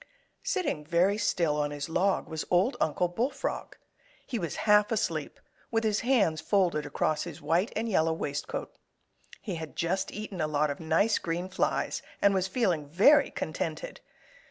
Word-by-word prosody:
Sitting 365 - -1
very 180 +6 +2
still 170 -8 +1
on 145 -1 0
his 145 -1 -5
log 185 +4 +1
was 160 -1 -4
Old 185 +9 +3
Uncle 170 +3 +1
Bullfrog. 235 +11 -3 0.5
He 240 -4 -3
was 170 -5 -3
half 210 0 +5
asleep, 225 -1 -2 0.3
with 225 0 0
his 215 -1 +1
hands 215 -11 +2
folded 175 -7 +1
across 150 +1 0
his 165 -4 -8
white 165 +8 +1
and 225 +2 -1
yellow 165 -6 +2
waistcoat. 145 -2 -4 0.7
He 190 -6 -4
had 160 -1 -7
just 185 +3 -1
eaten 210 -4 -5
a 155 - +1
lot 150 0 +1
of 140 - -6
nice 165 +7 +2
green 175 +2 -3
flies 190 - -1 0.2
and 200 0 +4
was 190 -1 +1
feeling 185 - 0
very 275 - +5
contented. - - -4
180 Hz, 160 wpm, -29 LUFS, 160-215 Hz, 0.7 s, half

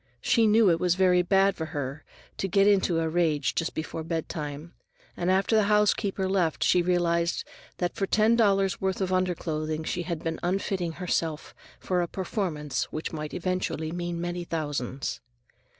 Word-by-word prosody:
She 230 -2 +3
knew 215 -2 +5
it 165 - +1
was 180 0 +2
very 180 -1 +4
bad 195 +2 +3
for 160 - -4
her 145 -1 -5 0.4
to 195 - 0
get 195 +2 +3
into 190 -4 +3
a 165 - 0
rage 155 -4 +1
just 165 - -2
before 160 0 -4
bedtime, 160 -1 -4 0.4
and 175 - -1
after 190 +4 +2
the 215 -2 +4
housekeeper 205 -2 +2
left 185 -5 +1
she 180 - +4
realized 170 -1 +1 0.3
that 175 -1 -1
for 195 - -2
ten 215 +3 +4
dollars' 195 -4 +2
worth 190 -1 -1
of 185 -1 -1
underclothing 160 -4 -1
she 175 - -2
had 170 -2 -4
been 165 -1 -2
unfitting 180 -1 -1
herself 165 -3 -2 0.3
for 180 -1 0
a 175 - -1
performance 170 - -2
which 155 +2 -5
might 150 -1 -5
eventually 180 -3 -2
mean 175 0 -3
many 175 0 -3
thousands. 145 -6 -3
175 Hz, 165 wpm, -27 LUFS, 160-190 Hz, 0.4 s, knew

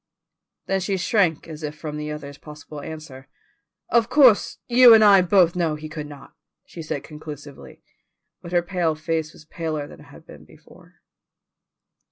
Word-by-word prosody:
Then 195 0 0
she 195 +1 -2
shrank 180 -4 0
as 155 -1 -9
if 150 0 -6
from 150 -1 -6
the 150 0 -5
other's 145 -2 -8
possible 150 0 -11
answer. 140 -4 -10 0.6
"Of 235 -1 +2
course 255 -6 +4
you 245 -1 +8
and 220 - +5
I 200 -2 +7
both 180 -2 +3
know 165 -3 0
he 155 +1 -8
could 155 -1 -7
not," 145 -2 -13 0.3
said 165 - -10
she - - -3
conclusively, 150 -2 -11 0.6
but 170 - -10
her 175 -1 +2
pale 175 -3 -1
face 155 0 -3
was 155 - -17
paler 155 -2 -4
than - - -14
it - - -15
had - - -16
been - - -14
before. - - -20
160 Hz, 170 wpm, -22 LUFS, 150-185 Hz, 0.6 s, you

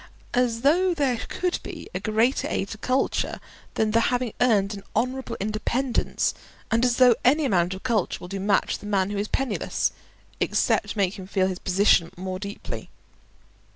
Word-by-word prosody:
As 240 -2 +1
though 350 +6 +3
there 265 -6 +1
could 360 -1 -1
be - - -8
a - - -2
greater 225 +4 +1
aid 195 - -2
to 215 - -7
culture 255 +4 0 0.4
than 220 -1 +1
the 230 - +4
having 245 -2 -1
earned 210 -5 +3
an 200 - -7
honourable 255 +4 -1
independence, 235 +5 0 0.4
and 230 +1 +2
as 245 -1 +3
though 250 -2 +7
any 295 +4 +4
amount 180 -5 +1
of 190 - -11
culture 230 -7 0
will - - -8
do 195 +2 -5
much 200 +1 +2
for - - -4
the 210 - -8
man 195 -1 +1
who 205 - -2
is 205 - -1
penniless, 260 -4 -1 0.5
except - - +1
make 200 -1 0
him 185 - -8
feel 190 -1 +1
his 185 -1 -2
position 185 -2 +3
more 185 0 -4
deeply. 200 +1 -6
215 Hz, 180 wpm, -25 LUFS, 195-250 Hz, 0.5 s, though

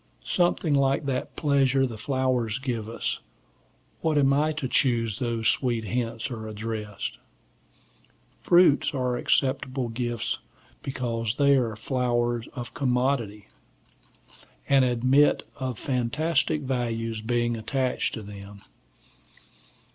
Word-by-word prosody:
Something 175 -3 +1
like 140 +1 +2
that 130 -2 -2
pleasure 135 -3 +3
the 120 -3 -5
flowers 125 -1 0
give 120 -5 -3
us: 115 - -2 0.8
what 160 -2 +1
am 140 -1 +4
I 150 +2 +2
to 150 -3 -4
whom 120 -3 +2
these 115 +1 -2
sweet 120 -1 +1
hints 115 +2 -3
are 110 -2 -5
addressed? 105 -1 -5 1.2
Fruits 175 -5 +4
are 125 -2 0
acceptable 130 0 0
gifts 120 0 -2 0.4
because 115 -4 -2
they 140 0 +4
are 125 -4 +2
the 110 - -7
flower 120 0 0
of 120 -2 -6
commodities, 125 -5 0 1.2
and 135 -1 +5
admit 130 +4 +3
of 130 -3 -3
fantastic 150 +5 0
values 115 -4 -2
being 120 +1 0
attached 130 +3 -1
to 110 - -7
them. 100 0 -10
125 Hz, 115 wpm, -26 LUFS, 115-135 Hz, 1.2 s, and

